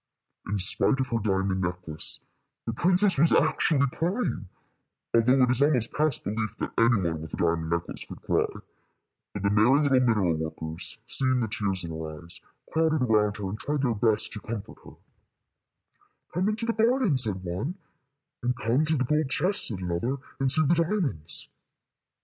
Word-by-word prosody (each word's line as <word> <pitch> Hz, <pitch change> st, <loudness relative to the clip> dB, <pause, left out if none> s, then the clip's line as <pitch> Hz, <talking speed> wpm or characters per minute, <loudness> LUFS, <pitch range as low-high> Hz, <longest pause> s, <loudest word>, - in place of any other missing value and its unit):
In 100 Hz, +1 st, -1 dB
spite 100 Hz, +8 st, +3 dB
of 130 Hz, -1 st, -1 dB
her 115 Hz, -1 st, 0 dB
diamond 95 Hz, -2 st, -1 dB
necklace, 90 Hz, -3 st, -1 dB, 0.4 s
the 115 Hz, -, -3 dB
princess 180 Hz, -, +3 dB
was 165 Hz, +3 st, +6 dB
actually 155 Hz, -2 st, +2 dB
crying, 175 Hz, -, -2 dB, 0.6 s
although 125 Hz, +3 st, +4 dB
it 125 Hz, -, +3 dB
is 130 Hz, +1 st, +2 dB
almost 130 Hz, -6 st, +2 dB
past 150 Hz, -3 st, 0 dB
belief 110 Hz, -1 st, -3 dB
that -, -, -4 dB
any 115 Hz, +1 st, +4 dB
one 85 Hz, -4 st, -2 dB
with 80 Hz, -, -7 dB
a -, -, -12 dB
diamond 85 Hz, -1 st, 0 dB
necklace 85 Hz, 0 st, -3 dB
could -, -, -10 dB
cry; -, -, +1 dB, 0.8 s
but 105 Hz, -, -6 dB
the 100 Hz, -, +2 dB
merry 115 Hz, +8 st, +4 dB
little 135 Hz, -3 st, +3 dB
mineral 105 Hz, -9 st, +2 dB
workers, 80 Hz, +4 st, -4 dB
seeing 130 Hz, 0 st, +2 dB
the 110 Hz, -, -1 dB
tears 100 Hz, -3 st, -1 dB
in 85 Hz, -, -6 dB
her 80 Hz, -1 st, -7 dB
eyes, 85 Hz, -, -4 dB, 0.3 s
crowded 160 Hz, -3 st, +2 dB
around 105 Hz, -3 st, +2 dB
her, 100 Hz, -2 st, -4 dB
and 105 Hz, +3 st, -6 dB
tried 145 Hz, -1 st, -2 dB
their 120 Hz, -3 st, +1 dB
best 110 Hz, -1 st, +2 dB
to 105 Hz, -, -6 dB
comfort 110 Hz, -1 st, -7 dB
her. -, -, -14 dB, 1.4 s
"Come 185 Hz, +4 st, 0 dB
into 220 Hz, +2 st, -3 dB
the 230 Hz, -, 0 dB
garden," 225 Hz, -, +2 dB
said 105 Hz, -7 st, +2 dB
one; 95 Hz, -, -4 dB, 0.7 s
and 125 Hz, +1 st, -1 dB
"Come 120 Hz, +6 st, 0 dB
to 155 Hz, 0 st, +1 dB
the 130 Hz, -, +1 dB
gold 150 Hz, +2 st, 0 dB
chests," 190 Hz, +8 st, +2 dB
said 100 Hz, -5 st, -2 dB
another, 90 Hz, +10 st, -2 dB, 0.2 s
"and 135 Hz, -1 st, +2 dB
see 155 Hz, +3 st, +4 dB
the 155 Hz, -, +3 dB
diamonds." 165 Hz, -, -1 dB
115 Hz, 180 wpm, -26 LUFS, 95-150 Hz, 1.4 s, was